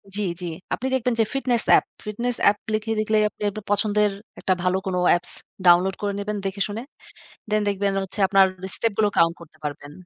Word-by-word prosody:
জি, 210 - 0 0.2
জি। 180 - -4 0.3
আপনি 260 - -2
দেখবেন 250 -1 +1
যে 225 - +6
fitness 250 -4 +1 0.2
app, - - 0 0.2
fitness 235 +4 -2
app 205 - 0 0.2
লিখে 215 +1 -1
লিখলেই 215 0 +2
আপনি - - -25
আপনার 215 +1 -8
পছন্দের 210 0 +2 0.3
একটা 185 - +1
ভালো 185 +1 +2
কোনো 185 -1 -1 0.2
apps 175 - -11 0.3
download 180 +2 +5
করে 205 -1 -1
নিবেন 210 +1 -3
দেখে 195 +1 -3
শুনে। 210 +3 -5 0.7
দ্যান 215 0 +2
দেখবেন 200 0 0
হচ্ছে 190 - -7
আপনার 195 0 +5 0.3
step 230 - +1
গুলো 210 -1 +3
count 165 0 +4
করতে 155 -1 -15
পারবেন। 145 0 -6
205 Hz, 190 wpm, -23 LUFS, 190-215 Hz, 0.7 s, যে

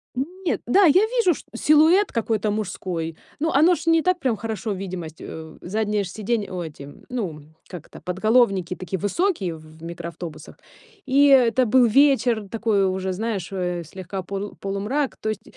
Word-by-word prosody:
Нет, 350 +7 -3
да, 380 +11 +5
я 365 +7 +5
вижу 455 -6 +2
шт - - -12
силуэт 315 - +4
какой-то 220 -2 0
мужской, 180 -6 -3 0.2
ну, 320 +2 0
оно 320 +6 +5
ж - - -8
не 330 -1 +4
так 365 +1 +1
прям 250 -8 0
хорошо, 220 -1 -4
видимость, 180 -4 -6
э, 160 -1 -9
заднее 210 +2 -1
ж - - -6
сиденье, 215 +1 -2
ой, 175 -3 -4
эти, 145 -1 -11 0.2
ну, 185 -12 -4 0.3
как 175 -4 -9
это, - - -13
подголовники 190 -2 +2
такие 185 +1 -5
высокие 205 - 0
в 160 - -13 0.2
в - - -15
микроавтобусах. 170 0 -8 0.5
И 280 +1 +4
это 255 -2 +5
был 245 +2 +5
вечер 245 -4 +3
такой 215 -3 +1
уже, 190 0 -2
знаешь 205 -3 -3
э, 180 -2 -2
слегка 185 +3 -7
полу 200 +2 -5
полумрак, 210 +9 -2
то 220 - -3
есть 215 0 -4
210 Hz, 170 wpm, -23 LUFS, 185-265 Hz, 0.5 s, да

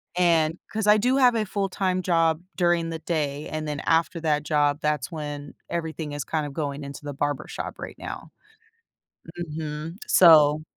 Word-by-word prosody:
and 165 -2 +3
'cause 220 -1 -2
I 210 0 +7
do 250 +5 +2
have 250 -3 +5
a 220 - +1
full 195 0 -2
time 185 -1 0
job 165 -2 +2
during 175 -2 +2
the 165 - -4
day, 150 -3 -2
and 155 0 -4
then, 150 -1 -3
after 165 +1 +1
that 150 -2 +1
job, 145 -1 +2
that's 150 -4 -1
when 145 -2 -6 0.2
everything 160 -2 -3
is 145 -1 -3
kinda 155 -1 -2
going 145 0 -4
into 140 +1 -8
the 145 - -5
barbershop 145 +1 -3
right - - -8
now. - - -7 1.1
Mhm, 155 0 -5
so 155 -3 +6
160 Hz, 165 wpm, -25 LUFS, 150-175 Hz, 1.1 s, I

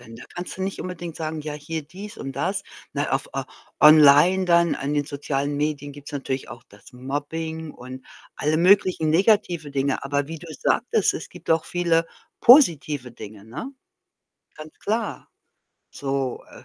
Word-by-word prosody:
Denn 115 -1 -12
da - - -11
kannst 175 +1 -6
du 190 - -4
nicht 195 +1 -3
unbedingt 175 -2 -6
sagen, 160 -1 -4
ja, 150 0 -5
hier 155 +2 -5
dies 200 +7 -10
und 135 - -5
das. - - -2 0.3
Na, - - -2
auf - - -1
au - - -2 0.4
online 155 +5 +7
dann 170 -1 +3
an 140 +1 -3
den 145 -1 +1
sozialen 140 0 -3
Medien 145 -1 -2
gibt's 145 0 -11
natürlich 135 -1 -4
auch 120 0 -11
das 100 0 -18
Mobbing 150 +5 -5
und 130 0 -10 0.3
alle 150 +1 0
möglichen 180 -2 +4
negative 175 -4 +2
Dinge. 140 -1 -1
Aber 140 0 -1
wie 165 +1 -7
du 170 +2 -12
sagtest, 145 - +1
es - - -6
gibt - - -15
auch 160 -1 +3
viele 170 -2 +1 0.3
positive 155 - +5
Dinge, 105 -3 -11
ne? 225 - -7 0.8
Ganz 155 0 -12
klar. 220 +1 -3 0.6
So, 135 -2 -3
äh, - - -14
150 Hz, 165 wpm, -23 LUFS, 140-170 Hz, 0.8 s, online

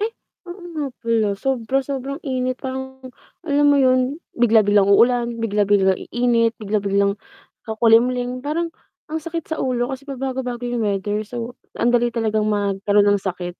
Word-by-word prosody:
Ay, 430 - +1 0.4
oo 350 +2 -9
nga 300 -2 -2 0.2
pala, 230 -2 +1
sobra-sobrang 270 - -2
init 255 -3 -1
parang 265 0 -6 0.4
alam 290 -3 +1
mo 285 0 +5
yun, 255 +4 +2 0.2
bigla-biglang 210 -4 +4
uulan, 235 +4 +4 0.2
bigla-bigla 205 -3 +2
iinit, 235 -1 +1
bigla-biglang 200 -1 0 0.5
kakulimlim 245 +3 +2
parang 320 +5 -2 0.4
ang 320 - -1
sakit 330 0 -6
sa 320 - -1
ulo 250 -1 -1
kasi 265 +1 -6
pabago-bago 260 -2 -4
yung 240 -2 -1
weather, 205 +1 -1
so 240 +1 -6 0.2
andali 240 0 +2
talagang 220 -2 0
magkaroon 205 0 +2
ng 200 - +1
sakit. 180 -1 -4
240 Hz, 135 wpm, -21 LUFS, 210-265 Hz, 0.5 s, mo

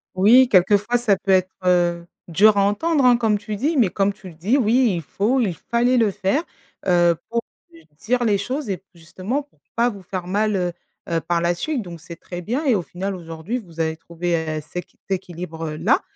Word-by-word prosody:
Oui, 240 +7 +6
quelquefois 205 +5 +4
ça 230 -4 +2
peut 195 +1 -2
être, 185 0 +3
heu, 175 -1 +2 0.2
dur 205 +5 +5
à 200 - +4
entendre, 270 +8 +1
hein, 245 -1 +6
comme 220 -3 +2
tu 210 +1 -5
dis, 290 +9 0
mais 230 -7 +4
comme 200 +2 0
tu 195 -2 -12
le - - -13
dis 205 - +1
oui 240 -2 +3
il 170 - -3
faut 210 - 0
il 205 -8 +1
fallait 240 +8 +1
le 220 -4 +3
faire, 195 - 0 0.4
heu, 175 -1 +4
pour 235 0 0 0.3
lui 165 -1 -18
dire 245 +2 0
les 205 -3 +3
choses 255 +5 -4
et 190 -1 -3
justement 185 - -4
pour 290 - -34 0.2
pas 235 +1 +3
vous 200 -4 -9
faire 180 -1 -5
mal, 210 +2 +1
heu 180 -2 0 0.4
heu, 165 -1 0
par 170 +1 0
la 170 +1 +2
suite 285 - -2
donc 170 -3 -10
c'est 170 0 -9
très 175 0 -8
bien 250 - -2
et 260 -5 +4
au 190 - 0
final 190 +3 -5
aujourd'hui 165 +5 -5
vous 170 -7 -14
avez 160 0 0
trouvé 170 +2 -5
et 160 -2 -1
ceq 170 +4 -8
t 195 - 0
équilibre 165 -3 -6
là 155 - +2
195 Hz, 220 wpm, -22 LUFS, 175-235 Hz, 0.4 s, Oui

